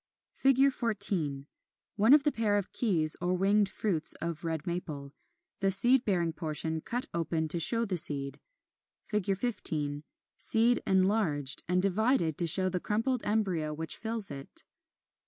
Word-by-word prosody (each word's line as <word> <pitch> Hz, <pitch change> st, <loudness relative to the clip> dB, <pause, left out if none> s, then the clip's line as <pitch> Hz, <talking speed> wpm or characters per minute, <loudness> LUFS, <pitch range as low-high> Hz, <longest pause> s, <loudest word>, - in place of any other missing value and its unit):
[Illustration: 270 Hz, 0 st, +3 dB
Fig. -, -, -14 dB
14. 175 Hz, -, -1 dB, 0.5 s
One 220 Hz, +6 st, +3 dB
of 295 Hz, -, +1 dB
the 295 Hz, -, 0 dB
pair 215 Hz, -4 st, -1 dB
of 200 Hz, -, -5 dB
keys 165 Hz, -10 st, +6 dB
or 180 Hz, +1 st, -1 dB
winged 200 Hz, +2 st, +1 dB
fruits 175 Hz, -8 st, +3 dB
of 170 Hz, -1 st, -6 dB
Red 160 Hz, -2 st, -5 dB
Maple; 150 Hz, -5 st, -7 dB, 0.5 s
the 195 Hz, -, 0 dB
seed 240 Hz, +7 st, +5 dB
bearing 175 Hz, -5 st, -1 dB
portion 160 Hz, 0 st, -3 dB
cut 245 Hz, +8 st, -5 dB
open 165 Hz, -1 st, -3 dB
to 170 Hz, -, 0 dB
show 230 Hz, +8 st, +1 dB
the 190 Hz, -4 st, -3 dB
seed. 145 Hz, -5 st, +3 dB, 0.6 s
15. 190 Hz, -8 st, -2 dB, 0.4 s
Seed 235 Hz, +2 st, +1 dB
enlarged, 185 Hz, -8 st, 0 dB
and 180 Hz, +1 st, -1 dB
divided 200 Hz, -, 0 dB
to 170 Hz, -, +2 dB
show 185 Hz, +3 st, +4 dB
the 185 Hz, -1 st, -3 dB
crumpled 225 Hz, +6 st, -2 dB
embryo 185 Hz, -8 st, -2 dB
which 160 Hz, +1 st, -3 dB
fills 225 Hz, -5 st, -4 dB
it. 140 Hz, -1 st, -2 dB
185 Hz, 150 wpm, -28 LUFS, 160-220 Hz, 0.6 s, keys